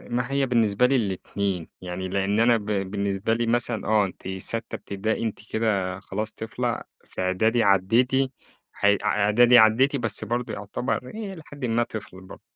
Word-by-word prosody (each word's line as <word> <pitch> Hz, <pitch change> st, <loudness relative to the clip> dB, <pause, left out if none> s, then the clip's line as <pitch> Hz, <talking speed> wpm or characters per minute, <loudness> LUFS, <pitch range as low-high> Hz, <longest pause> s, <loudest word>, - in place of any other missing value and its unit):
ما 125 Hz, +2 st, -1 dB
هي 140 Hz, -1 st, +2 dB
بالنسبة 115 Hz, -2 st, +2 dB
لي 135 Hz, +2 st, +3 dB
الاتنين، 100 Hz, -4 st, -2 dB
يعني 90 Hz, +1 st, -5 dB
لأن 100 Hz, +2 st, 0 dB
أنا 115 Hz, 0 st, +5 dB
ب 105 Hz, -, -8 dB
بالنسبة 100 Hz, +1 st, -1 dB
لي 115 Hz, +1 st, 0 dB
مثلًا، 120 Hz, -2 st, 0 dB
آه، 105 Hz, -1 st, +4 dB
أنتِ 95 Hz, 0 st, -9 dB
ساتّة 105 Hz, +4 st, -4 dB
إبتدائي، 105 Hz, +3 st, -3 dB
أنتِ 110 Hz, -, -3 dB
كده 100 Hz, -4 st, 0 dB
خلاص 110 Hz, +1 st, -4 dB
طفلة 120 Hz, +2 st, -3 dB, 0.2 s
في -, -, -6 dB
إعدادي 110 Hz, +6 st, +2 dB
عدّيتي 120 Hz, +7 st, +3 dB, 0.4 s
ح -, -, -3 dB, 0.2 s
إعدادي، 105 Hz, +4 st, +5 dB
عدّيتي، 120 Hz, +6 st, +5 dB
بس 110 Hz, -4 st, -1 dB
برضه 120 Hz, +3 st, -2 dB
يعتبَر 115 Hz, +5 st, -3 dB
هي 210 Hz, -3 st, -5 dB
إلى 165 Hz, -, -10 dB
حد 145 Hz, -3 st, -6 dB
ما 120 Hz, 0 st, +2 dB
طفل 95 Hz, -5 st, -8 dB
برضه. 95 Hz, -, -12 dB
110 Hz, 165 wpm, -25 LUFS, 100-120 Hz, 0.4 s, أنا